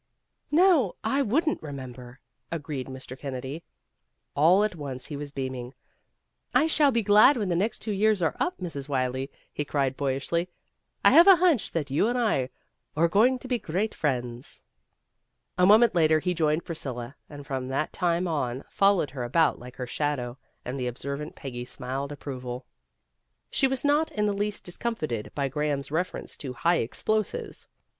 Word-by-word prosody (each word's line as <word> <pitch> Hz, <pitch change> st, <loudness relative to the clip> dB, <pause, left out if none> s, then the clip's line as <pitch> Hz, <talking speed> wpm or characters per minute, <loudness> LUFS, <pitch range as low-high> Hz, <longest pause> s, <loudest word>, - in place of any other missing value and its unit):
"No, 315 Hz, -, +4 dB
I 275 Hz, +1 st, +1 dB
wouldn't 305 Hz, +7 st, +1 dB
remember," 130 Hz, -3 st, -8 dB, 0.3 s
agreed 145 Hz, -5 st, -4 dB
Mr. 130 Hz, -1 st, -8 dB
Kennedy. 135 Hz, +3 st, -6 dB, 0.7 s
All 170 Hz, +8 st, +5 dB
at 215 Hz, -, 0 dB
once 135 Hz, -5 st, -6 dB
he 150 Hz, -, -6 dB
was 145 Hz, 0 st, -6 dB
beaming. 130 Hz, -2 st, -5 dB, 0.8 s
"I -, -, +5 dB
shall 310 Hz, -2 st, +4 dB
be 230 Hz, -2 st, +1 dB
glad 210 Hz, +7 st, +6 dB
when 205 Hz, -5 st, -1 dB
the 175 Hz, -, +1 dB
next 210 Hz, +6 st, -1 dB
two 220 Hz, -, -2 dB
years 210 Hz, +1 st, +2 dB
are 165 Hz, -3 st, 0 dB
up, 360 Hz, -, 0 dB
Mrs. 150 Hz, -6 st, -6 dB
Wylie," 130 Hz, 0 st, -1 dB, 0.2 s
he 150 Hz, -, -2 dB
cried 140 Hz, -2 st, 0 dB
boyishly. 140 Hz, +6 st, -1 dB, 0.6 s
"I -, -, +8 dB
have 340 Hz, +3 st, +8 dB
a 390 Hz, -, +10 dB
hunch 340 Hz, -, +2 dB
that 150 Hz, -4 st, -2 dB
you 150 Hz, +9 st, +2 dB
and 245 Hz, +1 st, 0 dB
I 205 Hz, -, +1 dB, 0.5 s
are 165 Hz, +2 st, +4 dB
going 230 Hz, +9 st, +4 dB
to 255 Hz, -, -10 dB
be 250 Hz, -2 st, 0 dB
great 195 Hz, +5 st, -2 dB
friends." 125 Hz, -4 st, -3 dB, 0.9 s
A 180 Hz, -, +4 dB
moment 220 Hz, +2 st, +6 dB
later 160 Hz, -3 st, +4 dB
he 180 Hz, +3 st, -1 dB
joined 160 Hz, -1 st, +1 dB
Priscilla, 135 Hz, -7 st, -5 dB
and 145 Hz, -1 st, -9 dB
from 135 Hz, -3 st, -3 dB
that 135 Hz, +4 st, -2 dB
time 175 Hz, 0 st, 0 dB
on 135 Hz, -5 st, -2 dB
followed 195 Hz, -7 st, +3 dB
her 130 Hz, -3 st, -4 dB
about 150 Hz, +6 st, +2 dB
like 125 Hz, +1 st, -11 dB
her 125 Hz, -, -4 dB
shadow, 125 Hz, -2 st, -2 dB, 0.3 s
and 130 Hz, +2 st, -4 dB
the 125 Hz, -, -1 dB
observant 140 Hz, +5 st, -5 dB
Peggy 120 Hz, -3 st, -6 dB
smiled 130 Hz, +3 st, -4 dB
ap 145 Hz, -, -9 dB
proval. 125 Hz, -2 st, -6 dB, 0.9 s
She 270 Hz, -, +3 dB
was 265 Hz, +1 st, -2 dB
not 295 Hz, +2 st, +3 dB
in 210 Hz, -1 st, 0 dB
the 205 Hz, -, +1 dB
least 205 Hz, +1 st, -2 dB
discomfited 165 Hz, -, -3 dB
by 140 Hz, -1 st, 0 dB
Graham's 145 Hz, 0 st, -2 dB
reference 175 Hz, +4 st, -3 dB
to 130 Hz, -3 st, -6 dB
high 170 Hz, +7 st, +2 dB
explosives. 215 Hz, -, -2 dB
155 Hz, 170 wpm, -27 LUFS, 130-205 Hz, 0.9 s, a